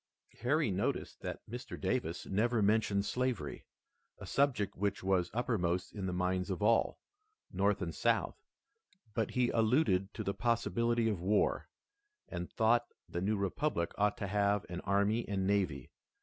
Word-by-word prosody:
Harry 140 -1 +2
noticed 95 +2 -2
that - - -6
Mr. 120 +3 -7
Davis 85 -10 -1
never 110 +3 +1
mentioned 105 -1 +2
slavery, 125 -2 -2 0.5
a - - -9
subject 130 -8 +1
which 100 0 -1
was 95 -2 +2
uppermost 95 -7 -1
in 100 -3 -4
the - - -1
minds 90 +1 0
of 95 +2 -2
all, 115 +1 +3 0.5
North - - +1
and - - -3
South, - - +1 0.8
but 110 -2 0
he 125 -1 +1
alluded 110 -4 +2
to - - -3
the 100 - -1
possibility 115 0 +1
of 105 -6 -1
war, 100 +4 +1 0.6
and 90 0 -5
thought 120 +1 +3 0.2
the 85 - -4
new 105 +3 +1
republic 100 - -1
ought 105 0 +1
to - - -3
have 100 0 +1
an 90 0 -4
army 100 +4 +2
and 95 -2 0
navy. 95 -10 0
105 Hz, 150 wpm, -33 LUFS, 95-115 Hz, 0.8 s, all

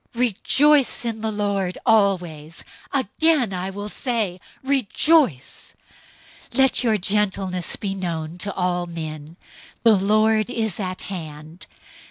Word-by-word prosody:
004:004 - - -7
Rejoice 265 +4 +3
in 225 -2 -3
the 220 0 -1
Lord 200 -3 -2
always! 180 -8 +1 0.3
Again 275 -2 +1
I 185 +1 -3
will 205 +2 -6
say, 210 -6 -2 0.2
Rejoice! 270 - +1 0.7
004:005 - - -9
Let 265 -1 +4
your 225 -3 +2
gentleness 190 -2 -1
be 195 -2 -3
known 170 -3 -4
to 200 - -4
all 180 -1 -1
men. 160 -1 -7 0.5
The 225 -2 +6
Lord 215 +3 +2
is 220 -5 -2
at 185 -2 -4
hand. 160 -2 -8
200 Hz, 125 wpm, -22 LUFS, 180-225 Hz, 0.7 s, The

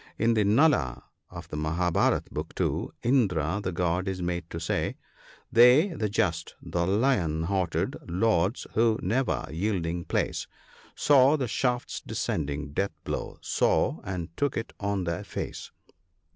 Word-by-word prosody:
In 115 +1 +3
the 110 -2 +3
"Nala" 110 - +3 0.3
of - - -9
the - - -6
Mahabharat 80 +3 +1
(Book 75 +2 -5
2) - - -1
Indra 100 - +2
the 95 - -1
god 90 +2 0
is 95 -1 -2
made 85 -1 -3
to 80 - -5
say 80 - -1 0.3
— - - -25
"They, 125 - +7
the 110 - -2
just 85 -4 -1
— - - -40
the 85 0 -2
lion 95 - +1
hearted, 95 -1 -1
— - - -18
Lords, 110 -2 +2
who, 115 0 +3
never 120 +8 0
yielding 85 -1 -2
place, - - -1 0.5
Saw 140 +1 +5
the 130 -4 -1
shaft's 125 +1 -1
descending 70 0 -3
death 100 +2 -1
blow - - -4
— - - -39
saw, 80 - +1
and 85 -4 -5
took 145 -1 0
it 115 - -4
on 100 -1 -1
their 85 -1 -2
face - - -6
95 Hz, 160 wpm, -27 LUFS, 85-115 Hz, 0.5 s, They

